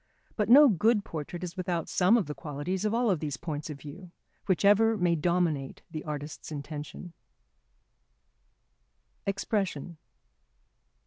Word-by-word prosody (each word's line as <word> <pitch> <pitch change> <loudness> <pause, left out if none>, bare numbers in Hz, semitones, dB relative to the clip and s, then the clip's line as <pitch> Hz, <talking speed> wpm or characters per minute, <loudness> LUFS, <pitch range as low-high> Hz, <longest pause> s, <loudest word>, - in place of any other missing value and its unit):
But 210 -1 0
no 285 +4 +9
good 215 - +2
portrait 165 +3 -6
is 175 0 -5
without 180 -3 -2
some 190 +6 +4
of 215 - 0
the 150 - -5
qualities 150 +7 -4
of 210 - +1
all 235 -5 +2
these 150 -5 -4
points 155 0 -5
of 150 - -6
view, 170 +6 -10 0.4
whichever 205 +4 +4
may 175 -3 +2
dominate 165 -4 0
the 155 - -5
artist's 150 +1 -6
intention. 150 +3 -7 2.1
[Sidenote: - - -24
Expression. 190 -5 -2
175 Hz, 130 wpm, -29 LUFS, 150-200 Hz, 2.1 s, no